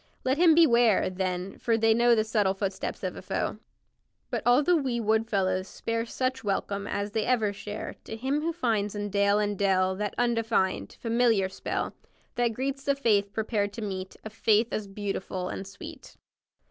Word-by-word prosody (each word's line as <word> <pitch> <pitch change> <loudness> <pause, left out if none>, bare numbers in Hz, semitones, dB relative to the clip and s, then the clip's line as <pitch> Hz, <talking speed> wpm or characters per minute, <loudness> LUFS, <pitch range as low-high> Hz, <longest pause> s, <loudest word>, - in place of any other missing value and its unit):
Let 265 +3 +1
him 335 -3 +6
beware, 235 - +4
then, 185 0 -3
for 230 -1 +1
they 225 0 +4
know 235 +1 +4
The 215 - +2
subtle 210 -3 +1
footsteps 195 -1 -4
of - - -3
a - - -8
foe. - - -3 0.7
But - - -1
all 245 +4 +5
the 355 +4 +4
wee 260 -6 0
wood 220 0 +1
fellows 185 -2 0
spare 230 +3 -3
Such 260 +2 -2
welcome 200 0 -2
as 205 0 -2
they 220 0 0
ever 225 -5 +2
share 210 +1 -6
To - - -6
him 265 +6 -1
who 330 +2 0
finds 220 - -1
in 205 0 -3
dale 200 0 +3
and 205 -1 0
dell 190 -1 +2
That 210 +1 -3
undefined, 225 - 0
familiar 230 -4 +2
spell 190 - -3 0.4
That 240 -2 +1
greets 270 +3 -3
the 280 0 +1
faith 210 -7 +2
prepared 210 -1 -1
to 225 - -6
meet 190 -2 -5
A 220 - -6
faith 220 +1 +2
as 215 -2 -3
beautiful 195 -2 -4
and 195 - -5
sweet. 195 +1 -11
215 Hz, 185 wpm, -27 LUFS, 200-240 Hz, 0.7 s, him